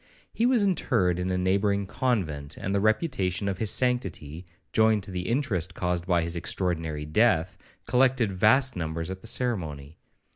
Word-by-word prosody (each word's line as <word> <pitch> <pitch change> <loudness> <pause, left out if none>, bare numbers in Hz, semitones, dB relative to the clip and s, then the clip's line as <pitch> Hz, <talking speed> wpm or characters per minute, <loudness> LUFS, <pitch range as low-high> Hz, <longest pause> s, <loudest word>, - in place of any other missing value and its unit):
He 235 - +2
was 245 -4 +3
interred 115 - +1
in 90 +1 -2
a 90 - 0
neighbouring 100 +2 +1
convent; 90 - -2
and 100 - -3
the 100 - +1
reputation 110 - 0
of 95 -2 -2
his 110 - 0
sanctity, 95 - -1 0.3
joined 110 -2 +3
to 95 - -8
the 90 +2 -4
interest 95 - -1
caused 90 -1 -2
by 85 -2 +2
his 85 +1 -3
extraordinary 80 -3 -2
death, 90 0 +2 0.3
collected 125 -2 +2
vast 125 +7 +3
numbers 80 +1 -3
at 95 0 -7
the - - -3
ceremony. 80 - -3
95 Hz, 160 wpm, -26 LUFS, 85-115 Hz, 0.3 s, was